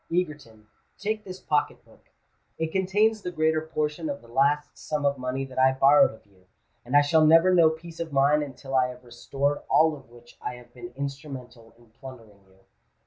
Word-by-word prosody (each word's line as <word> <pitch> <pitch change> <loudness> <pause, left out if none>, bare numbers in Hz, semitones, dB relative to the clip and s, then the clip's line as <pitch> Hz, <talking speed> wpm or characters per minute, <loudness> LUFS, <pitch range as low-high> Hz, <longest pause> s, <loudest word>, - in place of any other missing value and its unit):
Egerton, 150 -11 -3 0.3
take 215 +1 -3
this 185 -2 -9
pocket 145 -1 -1
book: - - -24 0.5
it 160 0 -3
contains 205 +4 +1
the 180 - -4
greater 155 -1 +1
portion 155 0 -3
of 140 0 -4
the - - -16
last 140 +5 0
sum 150 -1 -4
of 140 0 +2
money 130 +1 -3
that 130 -1 -7
I 130 0 +5
borrowed 135 +2 +5
of 110 - -17
you; 95 -2 -27 0.4
and 125 +4 +2
I - - +7
shall 155 +2 +3
never 165 +4 +6
know 170 -3 +6
peace 160 +1 -9
of 165 -2 -4
mind, 140 +2 +3
until 135 -1 -8
I 130 -1 +3
have 125 0 -11
restored 135 +4 -2
all 155 +2 +4
of 135 -3 -16
which 120 0 -18
I 125 - -5
have 120 0 -16
been 120 -1 -10
instrumental 135 -5 -8
in 120 -2 -23
plundering 115 -5 -13
you." 95 0 -26
140 Hz, 195 wpm, -26 LUFS, 125-160 Hz, 0.5 s, I